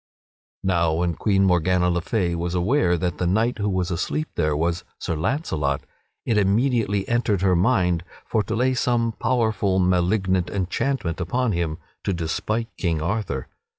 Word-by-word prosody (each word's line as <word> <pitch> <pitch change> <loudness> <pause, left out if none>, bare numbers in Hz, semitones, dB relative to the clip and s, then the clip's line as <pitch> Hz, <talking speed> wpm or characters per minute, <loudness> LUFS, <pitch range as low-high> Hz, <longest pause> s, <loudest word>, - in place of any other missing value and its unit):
Now 85 -4 +2
when 85 +1 0
Queen 95 +3 +2
Morgana 90 0 +3
le 85 0 0
Fay 90 -2 0
was 85 +1 -2
aware 90 -1 +2
that 90 +1 -2
the 90 - +1
knight 110 +6 +1
who 105 0 0
was 95 -1 -1
asleep 155 - -2
there 75 -3 0
was 85 +2 0
Sir 85 - -3
Launcelot, 80 - -1 0.4
it 110 -3 +2
immediately 105 -1 +1
entered 115 -5 +1
her 95 -2 +4
mind 90 -4 +2 0.2
for 110 - +1
to - - -3
lay 130 +3 +2
some 120 -2 +1
powerful, 110 -6 +1
malignant 95 0 +2
enchantment 95 -1 -1
upon 120 +8 0
him 85 -4 -1 0.3
to 100 - 0
despite 110 +7 -2
King 85 -4 0
Arthur. 85 - -2
95 Hz, 155 wpm, -23 LUFS, 85-110 Hz, 0.4 s, her